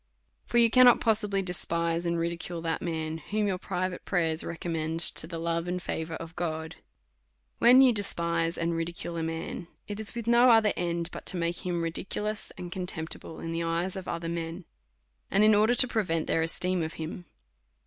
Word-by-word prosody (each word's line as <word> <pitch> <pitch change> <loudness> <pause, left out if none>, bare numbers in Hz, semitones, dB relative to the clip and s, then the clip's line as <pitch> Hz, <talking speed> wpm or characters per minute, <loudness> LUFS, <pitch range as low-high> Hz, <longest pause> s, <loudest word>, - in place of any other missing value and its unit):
For 240 - 0
you 230 -1 +6
can 255 +1 +7
not 245 - +6
possibly 210 -3 +1
despise 170 -1 -1
and 170 0 0
ridicule 170 +1 -3
that 165 0 -2
man 160 -2 -3
whom 210 +6 -2
your 190 -3 -1
private 185 0 -3
prayers 165 -4 0
recommend 165 -1 -3
to 160 -1 +5
the 165 -1 -6
love 165 +1 -2
and 180 +1 -2
favour 160 -2 -4
of 165 +1 -9
God. 160 -2 -4 0.8
When 255 +3 +7
you 255 -2 +5
despise 170 -5 0
and 170 0 -1
ridicule 170 +1 -4
a 165 - -2
man^ 165 +1 -4 0.2
it 205 0 -5
is 220 +1 -4
with 235 -2 -4
no 235 +2 +5
other 225 -3 +5
end 170 0 -2
but - - -9
to 185 - +3
make 170 +1 -2
him 175 -2 -1
ridiculous 210 +5 -3
and 175 -1 -7
contempti 175 -3 -4
ble 160 - -10
in 165 - -4
the 165 0 -2
eyes 170 +2 -1
of 190 -1 -7
other 170 0 -4
men_, 165 +1 -4 0.7
and 200 - +3
in 215 0 +6
order 215 +4 +4
to 255 - +4
prevent 180 -9 -1
their 165 - +1
esteem 180 +2 0
of 160 0 -3
him. 165 +3 -7
170 Hz, 195 wpm, -28 LUFS, 165-200 Hz, 0.8 s, can